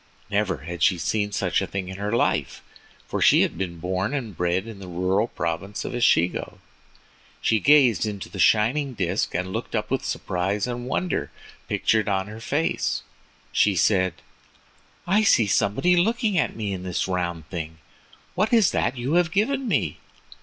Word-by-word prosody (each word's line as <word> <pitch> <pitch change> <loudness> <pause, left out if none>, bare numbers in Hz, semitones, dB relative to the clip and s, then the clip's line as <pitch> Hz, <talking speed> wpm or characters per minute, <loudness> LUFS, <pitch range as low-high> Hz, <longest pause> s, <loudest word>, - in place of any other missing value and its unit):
Never 100 -4 +1
had 85 +1 -6
she 90 - +4
seen 105 +4 -1
such - - 0
a - - -2
thing 95 -2 -4
in 95 0 -7
her 105 +1 -3
life, 115 - 0 0.4
for - - -3
she - - +6
had - - -2
been 85 -1 -4
born 95 - -2
and 115 -9 -4
bred 90 +3 0
in 110 -3 -9
the 95 - -9
rural 95 +5 0
province 85 +3 -4
of - - -4
Echigo. 90 -8 +1 0.8
She 110 - +2
gazed 135 -6 +4
into 100 -2 -5
the 100 - -9
shining 125 - +3
disk, 95 -1 -1
and 95 +2 -2
looking 115 0 -3
up 105 +1 -4
with 135 - 0
surprise 95 +2 -2
and 120 0 -5
wonder 180 +6 -1 0.4
pictured 110 -1 +1
on 95 -1 0
her 105 +2 -9
face, 145 +8 -1 0.5
she 100 -2 +3
said: 95 0 +2 0.9
"I 195 +4 +3
see 200 - +4
somebody 105 - +2
looking 220 +3 +1
at 160 - +1
me 105 -3 -3
in 95 - -5
this 90 -1 -2
round 85 -4 -3
thing! 80 -3 -5 0.6
What 210 +5 0
is 225 -6 +5
it - - -7
that 125 +2 0
you 125 +5 -2
have 175 -1 +3
given 260 +7 0
me?" - - 0
105 Hz, 175 wpm, -24 LUFS, 90-130 Hz, 0.9 s, she